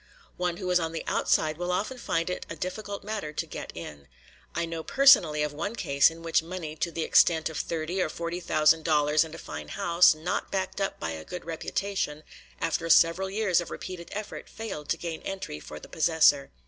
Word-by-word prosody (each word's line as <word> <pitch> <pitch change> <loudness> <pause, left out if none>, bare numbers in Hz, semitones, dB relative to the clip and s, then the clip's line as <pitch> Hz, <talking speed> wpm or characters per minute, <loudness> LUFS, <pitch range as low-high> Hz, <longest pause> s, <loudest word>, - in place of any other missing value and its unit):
One 180 -1 -1
who 185 - -5
is 180 - +4
on 165 -1 -3
the 165 - -4
outside 155 +1 +1
will 175 0 -1
often 215 +8 -2
find 165 -7 -1
it - - -4
a - - -5
difficult 200 +4 -5
matter 205 -7 -4
to - - -2
get - - -7
in. 70 -2 -9 0.5
I 170 - 0
know 165 -1 -5
personally 175 - +5
of 150 -1 -2
one 200 +9 -4
case 140 -10 +4
in 165 0 -12
which 165 0 +2
money 165 -2 -6
to 170 - -1
the 165 -1 -3
extent 160 -1 +4
of 155 - -4
thirty 170 +3 -2
or 155 - 0
forty 170 +2 -4
thousand 155 -2 +3
dollars 150 -1 +3
and 160 0 -9
a - - -8
fine 75 0 -7
house, 170 - +4
not 160 +3 -3
backed 190 +1 -2
up 195 - -2
by 80 - -3
a 80 -1 -6
good 180 - -8
reputation, 165 -2 -3 0.4
after 165 +1 -1
several 170 +4 +5
years 195 -3 +2
of 175 - -7
repeated 180 -2 -7
effort, 210 0 -6
failed 195 -10 -7
to 165 - +1
gain 165 -1 -5
entry 190 - -5
for 75 0 -9
the - - -12
possessor. 155 -3 +3
165 Hz, 210 wpm, -27 LUFS, 155-185 Hz, 0.5 s, personally